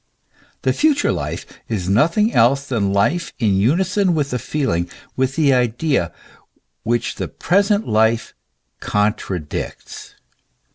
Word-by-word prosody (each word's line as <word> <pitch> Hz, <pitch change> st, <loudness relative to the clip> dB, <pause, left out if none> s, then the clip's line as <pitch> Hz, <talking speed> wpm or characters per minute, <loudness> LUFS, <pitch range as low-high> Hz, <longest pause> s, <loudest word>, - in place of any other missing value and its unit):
The -, -, +2 dB
future 300 Hz, -1 st, +2 dB
life -, -, -4 dB, 0.2 s
is 100 Hz, -6 st, -2 dB
nothing 170 Hz, -, +2 dB
else 135 Hz, +4 st, +3 dB
than 110 Hz, -8 st, -1 dB
life 100 Hz, -, 0 dB
in 110 Hz, -5 st, +1 dB
unison 175 Hz, -, +2 dB
with 145 Hz, -3 st, -1 dB
the 125 Hz, -, -1 dB
feeling, 90 Hz, -, -1 dB, 0.3 s
with 130 Hz, +1 st, 0 dB
the 145 Hz, -4 st, +3 dB
idea, 125 Hz, -, +1 dB, 0.7 s
which 120 Hz, 0 st, -1 dB
the -, -, -3 dB
present 200 Hz, +4 st, +1 dB
life 110 Hz, +1 st, +1 dB, 0.5 s
contradicts. 105 Hz, -6 st, -3 dB
125 Hz, 115 wpm, -20 LUFS, 105-165 Hz, 0.7 s, else